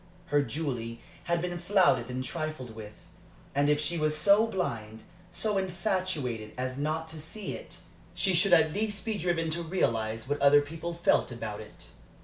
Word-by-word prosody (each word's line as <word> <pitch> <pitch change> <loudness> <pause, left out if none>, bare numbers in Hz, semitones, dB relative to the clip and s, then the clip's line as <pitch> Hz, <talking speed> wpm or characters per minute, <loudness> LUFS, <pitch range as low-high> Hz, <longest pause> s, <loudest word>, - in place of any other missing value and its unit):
Her 145 - +6
Julie 125 -6 -3 0.3
had 170 -1 0
been 175 -1 -3
flouted 185 -3 +3
and 130 +1 -3
trifled 155 -6 -4
with; 110 -1 -9 0.6
and 145 +1 +2
if 150 0 +3
she 155 +3 0
was 155 0 +1
so 205 +6 +5
blind, 115 - -3 0.3
so 210 +2 0
infatuated, 180 - -2
as 130 +1 -3
not 155 +2 -1
to 160 -1 -7
see 205 +7 -6
it, - - -9 0.3
she 190 - +2
should 180 +3 +3
at 160 -3 +5
least 205 -2 -1
be 220 - -1
driven 165 -2 0
to 170 +2 -1
realize 115 -10 -1
what 145 +1 -1
other 145 +1 +7
people 165 +3 -5
felt 170 -5 +2
about 110 -3 -5
it. 110 - -12
155 Hz, 170 wpm, -29 LUFS, 130-180 Hz, 0.6 s, other